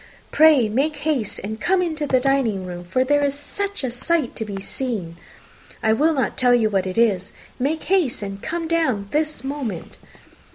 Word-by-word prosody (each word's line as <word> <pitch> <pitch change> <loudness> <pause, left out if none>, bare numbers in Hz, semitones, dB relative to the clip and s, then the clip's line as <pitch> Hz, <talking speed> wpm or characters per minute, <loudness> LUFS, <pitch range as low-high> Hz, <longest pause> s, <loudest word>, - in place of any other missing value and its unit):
pray 305 -7 +6
make 275 +8 0
haste 285 -7 -2
and 220 +2 -5
come 380 +1 +2
into 315 -4 -1
the 260 -2 +3
dining 250 -8 +1
room, 175 -1 -7
for 185 +9 +1
there 290 +2 +2
is 280 -1 +1
such 400 +5 -4
a 255 - -1
sight 295 +2 -1
to - - -2
be 200 -2 -5
seen! 200 -6 -4 0.7
I 220 -1 +4
will 310 +7 +2
not 265 - -1
tell 250 -1 +5
you 220 -3 +2
what 190 -2 +1
it 185 - -5
is. 205 -6 +2 0.3
Make 295 +5 -1
haste, 360 - +1
and 195 0 -6
come 330 +1 -3
down 260 -12 0
this 305 -4 -1
moment." 270 - -5
260 Hz, 190 wpm, -22 LUFS, 215-305 Hz, 0.7 s, pray